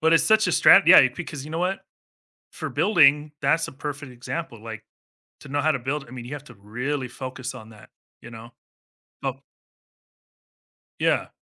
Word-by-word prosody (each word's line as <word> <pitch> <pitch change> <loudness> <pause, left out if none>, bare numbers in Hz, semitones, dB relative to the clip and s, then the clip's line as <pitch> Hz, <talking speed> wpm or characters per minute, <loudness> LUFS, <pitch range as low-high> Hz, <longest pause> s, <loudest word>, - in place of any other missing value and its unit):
But 160 +1 +3
it's 165 - +4
such 220 0 +4
a - - +1
strat - - +6
yeah, - - +8
because 145 -5 -7
you 155 - -10
know 160 - -3
what? 185 +2 -1 0.7
For - - -6
building, 150 -6 +3
that's 150 +4 +1
a - - -9
perfect 145 -1 -7
example, 120 -1 -7
like 110 -1 -8 0.6
to - - -13
know 145 +1 -1
how 155 +2 +2
to 135 - -2
build, 140 +3 -4
I - - -16
mean, 125 -2 -9
you 145 - -6
have 145 0 -9
to 125 - -15
really 125 +7 -4
focus 130 +1 -7
on 110 -3 -12
that, 105 -2 -16 0.3
you 120 - -12
know? 115 +1 -12 0.7
Oh 135 -1 -2 1.6
Yeah. - - +1
135 Hz, 185 wpm, -24 LUFS, 120-150 Hz, 1.6 s, yeah